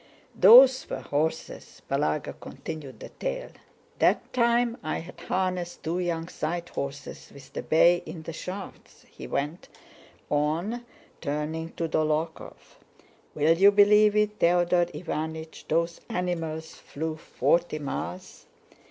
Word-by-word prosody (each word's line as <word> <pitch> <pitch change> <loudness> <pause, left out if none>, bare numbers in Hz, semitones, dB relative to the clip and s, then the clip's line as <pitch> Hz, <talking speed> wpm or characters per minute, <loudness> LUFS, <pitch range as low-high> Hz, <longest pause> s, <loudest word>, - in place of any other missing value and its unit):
"Those 255 +6 +8
were - - -4
horses!" 160 +3 -3
Balagá 75 0 -1
continued 145 -4 -8
the - - -8
tale. - - -5 0.5
"That - - +2
time 235 -1 +2
I'd 165 +3 -4
harnessed 185 -2 -2
two 165 +3 -1
young 170 -2 -2
side 170 +1 -4
horses 140 0 -6
with 135 -1 -15
the - - -3
bay 175 +2 +4
in 160 - -7
the 165 - -6
shafts," 185 +4 -8
he - - -9
went 150 +5 -3 0.6
on, 170 +12 -1 0.3
turning 155 +2 -3
to 165 - -2
Dólokhov. 155 +1 -3 0.6
"Will 155 +2 +4
you 195 +4 +7
believe 210 +1 +5
it, 210 0 +1
Theodore 175 0 +3
Iványch, 160 -1 -6
those 170 +1 0
animals 165 -5 -3
flew 160 +2 -5
forty 170 +1 0
miles? 180 +5 -6
170 Hz, 120 wpm, -27 LUFS, 155-185 Hz, 0.6 s, Those